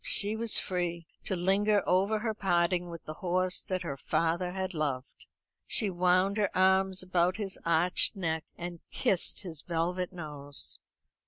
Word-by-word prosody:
She 205 +2 +3
was 225 -1 +3
free 175 -2 -1 0.2
to 190 - 0
linger 200 +3 +2
over 195 +4 +3
her 220 +1 -2
parting 175 -3 +1
with 170 -1 -9
the 155 - -5
horse 185 +2 0
that 185 -1 -3
her 140 -5 -4
father 170 +5 0
had 190 0 -3
loved. 140 -5 -4 0.4
She 210 -4 +2
wound 185 +3 +2
her 205 -2 +2
arms 190 0 +3
about 180 0 +1
his 200 -3 -4
arched 170 +5 +4
neck, 160 -4 -2
and 175 -1 -6
kissed 190 +2 0
his 165 -5 -7
velvet 175 +2 -2
nose. 150 -5 -4
180 Hz, 155 wpm, -30 LUFS, 170-190 Hz, 0.4 s, arched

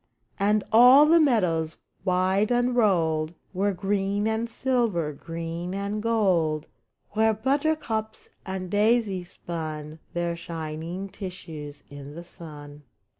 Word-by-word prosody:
And 205 +1 +2
all 250 +6 +8
the 330 +2 +6
meadows, 180 - +2 0.3
wide 185 +2 +2
unrolled. 190 -11 +2 0.2
Were 200 +2 +1
green 200 +2 0
and 220 +1 -1
silver, 230 - 0
green 165 +4 -5
and 200 +2 -2
gold. 185 -9 +1 0.5
Where 220 +1 +3
buttercups 265 -3 -1 0.2
and 190 -1 -5
daisies 205 -4 +1
spun 155 -2 -6
Their 170 0 -1
shining 165 +2 -5
tissues 160 -7 -8
in 145 0 -10
the 170 - -7
sun. 150 -4 -11
190 Hz, 110 wpm, -26 LUFS, 165-220 Hz, 0.5 s, all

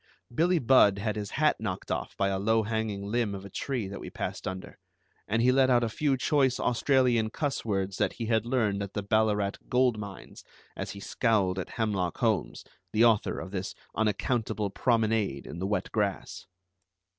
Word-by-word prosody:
Billie 175 +7 +3
Budd 120 -7 +5
had 105 +1 -2
his 105 -2 -4
hat 150 +5 +2
knocked 95 -4 -4
off - - -3
by 100 0 +1
a 95 -1 -1
low 110 +2 +2
hanging 110 -2 -2
limb 105 -1 -1
of 100 0 -8
a 100 - -10
tree 125 -3 -3
that 100 0 -7
we - - -7
passed - - -5
under, 95 0 -7 0.5
and 110 +3 +1
he 125 - +5
let 130 0 +4
out 120 -1 +4
a 115 - 0
few 140 +3 0
choice 135 -2 +2
Australian 125 -2 +2
cuss 145 +3 -2
words 100 -3 -2
that - - +1
he 115 - -5
had 110 -1 +1
learned 115 -5 0
at 100 -1 -5
the 105 - -3
Ballarat 105 -1 +1
gold 125 -3 +2
mines, 100 -2 -9 0.3
as - - -5
he 100 - -9
scowled 100 -4 +1
at 90 - -5
Hemlock 100 -6 -1
Holmes, - - 0 0.3
the 110 +2 +4
author 110 -3 +2
of 95 - -7
this 95 -1 -4 0.2
unaccountable 110 -1 -1
promenade 110 - +1
in 85 - -7
the 95 - -2
wet 105 - -2
grass. 105 -3 -2
110 Hz, 190 wpm, -28 LUFS, 100-120 Hz, 0.5 s, Budd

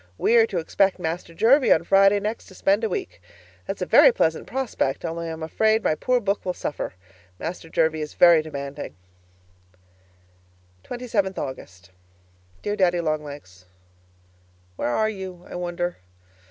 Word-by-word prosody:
We 235 - +2
are 225 -1 +5
to 190 - -4
expect 190 +3 +1
Master 170 -1 -4
Jervie 255 - +4
on 160 - +5
Friday 195 +2 +5
next 215 +3 -4
to 190 - -15
spend 200 +4 +1
a 220 - +1
week. 385 -2 -5 0.5
That's - - -3
a - - -1
very - - +7
pleasant 160 - 0
prospect 245 - -2
only 165 0 -4
I - - -4
am 160 0 -6
afraid 220 +7 +1
my - - +2
poor 250 +10 +1
book 200 -2 -1
will 180 -1 -3
suffer. 145 - -4 0.4
Master 165 - -6
Jervie 160 -1 +1
is 150 - -6
very 170 -2 +7
demanding. 140 -2 -7 1.9
27th 220 -6 -2
August 95 -9 -7 0.7
Dear 205 - -1
Daddy 180 -3 +2
Long 155 -2 -1
Legs, 95 -12 -11 1.1
Where - - -2
are 215 - +1
you, 190 -4 -7
I - - -11
wonder? 175 0 -3
175 Hz, 155 wpm, -24 LUFS, 160-210 Hz, 1.9 s, very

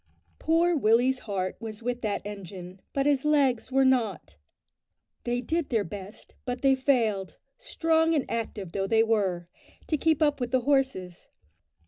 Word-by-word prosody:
Poor 335 +2 +2
Willie's 250 +1 +3
heart 185 -2 -2
was 220 -1 -7
with 245 0 -2
that 210 -3 -2
engine, 190 -2 -8
but 275 0 0
his 285 -2 +2
legs 275 -5 +2
were 270 0 +3
not. 225 - 0 0.9
They 245 0 -1
did 325 +3 -2
their 225 -4 +1
best, 200 +3 -9
but 245 +1 -4
they 270 -1 +5
failed, 235 -8 0 0.2
strong 325 -8 +1
and 290 - 0
active 215 -5 -4
though 195 +1 -2
they 225 +1 +4
were, 195 -6 0 0.4
to 310 - 0
keep 315 +1 +2
up 295 -2 +2
with 245 -1 -2
the 255 0 +1
horses. 260 -10 -1
245 Hz, 155 wpm, -27 LUFS, 205-275 Hz, 0.9 s, they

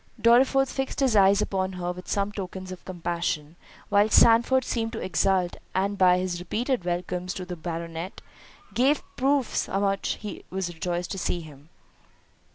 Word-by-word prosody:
Dorriforth 265 +3 +4
fixed 270 -1 -3
his 265 -5 +2
eyes 200 +1 +5
upon 190 -1 -2
her 180 -1 -3
with 180 +1 -9
some 200 0 0
tokens 190 -2 -6
of 185 - -9
compassion, 170 -3 -3 0.3
while 205 +1 +4
Sandford 235 +4 +5
seemed 225 -1 -2
to 225 - -4
exult, 185 -2 +1 0.2
and 195 +2 +1
by 180 -2 +5
his 180 -1 -2
repeated 230 +4 -2
"Welcomes" 180 +1 -2
to 185 - -5
the 180 -1 -6
Baronet, 165 +1 -5 0.5
gave 270 +4 +2
proofs 270 -1 +1
how 195 - -1
much 195 -1 0
he 210 - -7
was 185 -2 -3
rejoiced 175 +1 -3
to 195 - -3
see 175 -1 -1
him. 150 -1 -14
190 Hz, 165 wpm, -26 LUFS, 175-220 Hz, 0.5 s, eyes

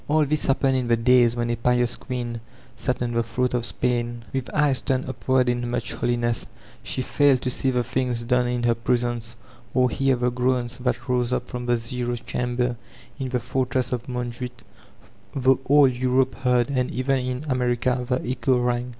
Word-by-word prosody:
An 155 0 +3
this 150 +1 0
happened 135 -1 +2
in 125 -2 0
the 115 -1 +3
days 120 0 +4
when 120 0 -1
a - - +1
pknis 120 0 +1
queen 120 -3 -4 0.3
sat 125 -2 -1
on 120 - -2
the 115 0 +1
throne 115 +2 -1
of 120 -1 0
Spain. 120 -1 -1
>^th 135 -1 -3
eyes 145 -3 +2
turned 130 0 -1
upward 130 0 +1
in 120 0 0
much 120 -1 -2
holiness, 120 -1 -1 0.3
she 130 - -3
failed 140 -1 +3
to 125 - 0
see 130 - 0
the 125 -1 +1
things 125 -1 -1
done 125 +1 +2
in 120 0 -1
her 120 -1 +4
prisons, 120 -1 -1 0.4
or 125 -2 +3
hear 135 -1 +2
the 125 0 0
groans 125 -1 0
that 125 -1 -2
rose 125 -1 +1
up 125 0 -1
from 125 0 -5
the 120 0 +3
''zero'* 120 +1 -2
chamber 125 0 -1 0.4
in 130 -1 -3
the 125 -1 0
fortress 125 +1 -1
of 125 -1 -3
Montjuich, 125 0 -5 0.7
though 130 -1 +3
all 145 0 +6
Europe 130 +1 +1
heard, 125 0 +1
and 125 -2 0
even 130 +1 0
in 125 +2 -3
America 125 -1 0
the 125 0 -1
echo 130 0 +1
rang. 120 0 0
125 Hz, 190 wpm, -24 LUFS, 120-130 Hz, 0.7 s, all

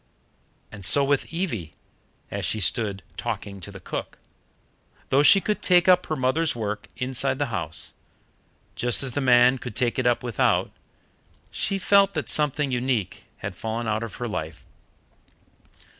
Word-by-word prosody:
And 100 -2 -10
so 105 +10 +6
with 140 0 0
Evie, 150 - -4 0.6
as - - -4
she 110 - -1
stood 100 -1 0
talking 100 -1 -5
to 95 - -9
the 100 - -10
cook. - - -6 0.9
Though 135 - +4
she 195 +7 +7
could 210 +2 -2
take 180 -1 +4
up 180 -1 +5
her 155 - -1
mother's 135 +3 +1
work 105 -2 -4
inside 130 +1 -1
the 140 -5 -2
house, 95 -4 -5 0.8
just 120 0 +1
as 135 - -1
the 145 - -2
man 125 0 +5
could 120 -4 -8
take 125 0 0
it 125 - +1
up 120 0 +1
without, 120 -4 +1 0.8
she 195 - -1
felt 200 +1 +3
that - - -3
something 150 -2 +2
unique 125 -5 -2 0.2
had - - -4
fallen 115 +1 -4
out 110 0 0
of 115 -4 -6
her 120 - -4
life. 80 -7 -6
125 Hz, 160 wpm, -24 LUFS, 110-145 Hz, 0.9 s, she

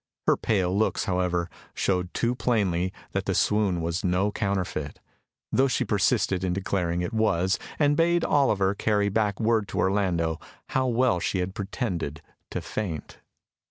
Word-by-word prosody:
Her - - +5
pale 95 -4 0
looks, 110 +2 +1
however, 90 -3 0 0.3
showed 90 -1 0
too 120 +1 +1
plainly 95 -8 0 0.2
that - - -2
the - - 0
swoon 105 -5 +2
was 85 +4 -2
no 95 +2 +1
counterfeit, 95 -8 -2 0.5
though 135 +1 +4
she 125 -1 0
persisted 95 -2 +1
in 90 -1 0
declaring 90 -2 -1
it 90 +6 -3
was, 95 -4 +2 0.2
and 145 -1 +3
bade 170 +2 +3
Oliver 105 -9 +3
carry 105 0 +1
back 105 -1 0
word 110 -2 +2
to - - -6
Orlando 90 -5 +1 0.3
how 130 0 +1
well 120 -5 +2
she 95 - -1
had 90 +1 -2
pretended 90 - -3 0.3
to - - -3
faint. 90 -8 -5
95 Hz, 155 wpm, -26 LUFS, 90-110 Hz, 0.5 s, Her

